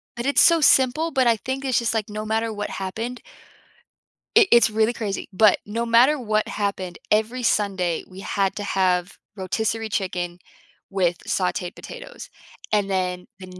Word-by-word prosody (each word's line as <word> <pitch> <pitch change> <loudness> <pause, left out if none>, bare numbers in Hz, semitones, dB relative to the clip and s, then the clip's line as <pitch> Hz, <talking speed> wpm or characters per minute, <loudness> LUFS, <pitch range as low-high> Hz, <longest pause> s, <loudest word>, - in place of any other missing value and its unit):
but 240 - -5
it's 280 - +4
so 335 -1 +6
simple, 290 +4 +3
but 265 -3 +2
I 230 -1 +4
think 265 +5 -4
it's 260 -2 +2
just, 235 -1 -1
like, 220 -1 -2
no 215 +1 -5
matter 225 +1 -1
what 205 -1 -4
happened 225 +6 -5 1.2
it 455 -3 +8
it's 235 -1 +6
really 220 +2 +2
crazy, 210 -4 -4
but 210 +2 +5
no 230 +3 -2
matter 245 +6 +5
what 215 -2 0
happened, 200 -3 -3
every 220 +4 +1
Sunday 190 -7 0
we 185 0 -11
had 195 -1 -1
to 205 - -4
have 185 -2 0 0.2
rotisserie 220 +3 -2
chicken 180 -4 -3 0.5
with 180 -3 0
sauteed 180 -1 -1
potatoes, - - -10 0.4
and 205 -2 +2
then 180 -1 -2
the 185 - -9
215 Hz, 165 wpm, -23 LUFS, 190-235 Hz, 1.2 s, it